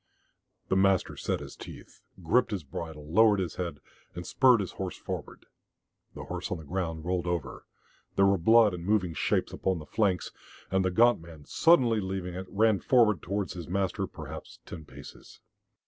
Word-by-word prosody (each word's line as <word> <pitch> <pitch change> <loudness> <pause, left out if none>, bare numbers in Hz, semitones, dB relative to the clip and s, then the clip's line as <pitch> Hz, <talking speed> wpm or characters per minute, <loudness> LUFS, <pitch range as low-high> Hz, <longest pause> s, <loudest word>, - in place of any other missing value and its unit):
The - - +2
master 95 -1 +2
set - - -2
his - - -9
teeth, - - -12 0.2
gripped 120 +10 +3
his 100 -6 -3
bridle, 75 +2 -7
lowered 110 0 +5
his 90 -3 -3
head, 90 -2 -4 0.4
and 90 0 -6
spurred 130 -4 +4
his 95 - -3
horse 95 -1 -5
forward. - - -7 0.7
The - - -7
horse - - -5
on 90 - -2
the 80 - -10
ground 80 0 -4
rolled 90 0 -1
over, 85 -7 -4 0.5
there 100 - +4
were 100 -1 +3
blood 110 +3 +5
and 85 -1 -6
moving 95 -3 +1
shapes - - 0
upon 95 -1 -1
the 75 - -8
flanks, 95 0 0 0.4
and 95 0 +2
the 95 - +1
gaunt 120 +2 +4
man, 80 -3 -13
suddenly 125 -10 +4
leaving 95 -2 -4
it, 95 +1 -6
ran 110 -1 +3
forward 110 -8 +3
towards 100 0 -3
his 85 -4 -7
master, 95 0 -1
perhaps - - -9
ten 80 -3 -9
paces. - - -13
95 Hz, 180 wpm, -28 LUFS, 85-105 Hz, 0.7 s, lowered